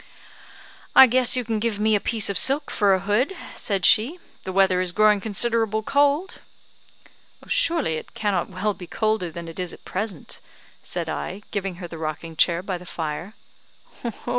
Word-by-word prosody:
"I 265 - +11
guess 255 0 +3
you 250 - -1
can 220 -1 -1
give 215 -2 -2
me 215 +1 +2
a 205 - +3
piece 220 0 0
of 200 - +3
silk 285 +3 +2
for 200 -3 +3
a 190 - -3
hood," 215 - 0 0.2
said 195 -4 -1
she, 250 +12 +4 0.3
"the 190 - -3
weather 190 -1 +3
is 180 -1 0
growing 210 0 +4
considerable 220 0 0
cold." 285 - +1 1.0
"Surely 320 - +1
it - - -10
cannot 200 -5 -1
well 200 +3 -2
be 180 -1 -11
colder 215 -2 -1
than 170 +1 -8
it 165 +2 -8
is 180 -1 -3
at - - -15
present," 190 -4 -5 0.4
said - - -4
I, 190 - -5
giving 195 -3 -3
her 175 0 -8
the 165 -1 -9
rocking 160 +1 -5
chair 170 +2 +2
by 185 -2 -4
the 180 - -13
fire. 165 +6 -5
205 Hz, 175 wpm, -23 LUFS, 180-225 Hz, 1.0 s, I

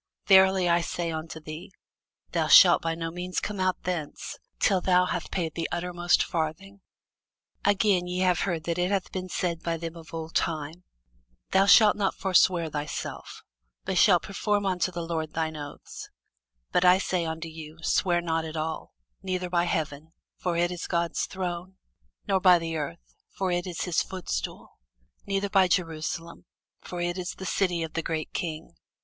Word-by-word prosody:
Verily 190 -1 +6
I 170 0 +3
say 170 0 -3
unto 160 0 -5
thee, 155 +3 -9 0.6
Thou - - 0
shalt - - +8
by 165 0 -1
no 165 0 -4
means 180 +1 -3
come 210 -2 -4
out 185 0 0
thence, 165 -4 -4 0.2
till 190 -3 +2
thou 180 0 +4
hast 175 -2 -3
paid 165 -4 -2
the 165 - -3
uttermost 175 0 +1
farthing. 175 +4 -4 0.8
Again, 200 -3 +2
ye 180 +1 -2
have 180 -1 +3
heard 170 -5 -1
that 170 +1 -2
it 180 +1 +1
hath 195 -2 -1
been 185 -1 -5
said 170 -2 -2
by 165 -1 -2
them 165 0 -6
of 165 -1 -12
old 165 0 -6
time, 160 +2 -2 0.7
Thou 195 +1 +4
shalt 210 +1 +7
not 200 -2 0
forswear 180 -3 +3
thyself, 150 -1 -5 0.4
but - - +1
shalt - - +5
perform 205 +1 -1
unto 185 -1 0
the 170 -1 -4
Lord 160 -2 -3
thine 160 -1 -2
oaths: 145 -1 -9 0.6
but 180 - +2
I 180 0 +7
say 185 -2 -1
unto 160 +1 -4
you, 160 -1 -10
Swear 175 0 +2
not 165 -1 -1
at 160 0 -6
all; 155 0 -4 0.3
neither 185 -1 -3
by 175 -1 +2
heaven; 160 -1 -3 0.2
for 175 -2 -2
it 175 +1 +2
is 175 -1 -5
God's 170 -1 -1
throne: 185 0 -5 0.5
nor 195 -1 +2
by 180 -1 +7
the 165 -1 -4
earth; 85 - -6 0.2
for 190 -2 -1
it 175 +1 -1
is 175 -2 -5
his 180 -3 +1
footstool: 165 - -5 0.5
neither 195 0 0
by 190 -3 +5
Jerusalem; 165 -1 -2 0.3
for 175 -1 -6
it 175 +1 -2
is 180 0 -4
the 190 - -8
city 180 -4 0
of 160 - -6
the 165 - -1
great 160 -1 -4
King. 160 -2 -4
175 Hz, 175 wpm, -27 LUFS, 160-185 Hz, 0.8 s, shalt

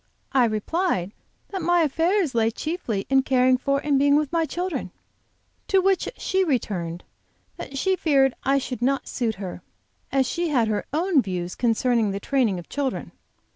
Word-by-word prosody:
I 260 -3 +4
replied 215 - -1 0.4
that 385 -2 -4
my 350 +1 +3
affairs 325 +2 +1
lay 225 -1 +2
chiefly 240 - -3
in 270 0 +4
caring 255 -1 +3
for 275 +2 0
and 285 -2 +2
being 285 +1 +4
with 295 -2 +1
my 335 -1 +1
children; 360 +2 -3 0.8
to 390 - +3
which 385 0 +1
she 380 0 +1
returned 185 - -2 0.5
that 275 - -7
she 380 +6 +2
feared 275 -7 +3
I 275 +1 +3
should 255 -3 -4
not 275 +3 0
suit 230 -4 -2
her, 190 -2 -7 0.5
as 270 -1 +2
she 345 +5 -1
had 245 -6 +2
her 210 -1 -2
own 325 0 +2
views 180 -4 -4
concerning 235 -1 +1
the 195 0 -3
training 235 -4 +1
of 175 - -9
children. 280 -3 -3
270 Hz, 170 wpm, -24 LUFS, 225-325 Hz, 0.8 s, I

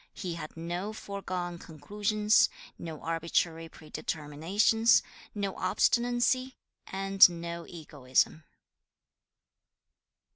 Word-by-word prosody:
He 180 -3 -4
had 165 -1 -8
no 175 +5 -4
foregone 185 -4 -5
conclusions, 210 +8 +1 0.3
no 160 -3 -7
arbitrary 165 0 -1
predeterminations, 165 +10 +1 0.3
no 200 -2 -2
obstinacy, 245 +6 +1 0.3
and 195 0 +5
no 170 0 -6
egoism. 150 -2 -1
175 Hz, 75 wpm, -29 LUFS, 165-210 Hz, 0.3 s, and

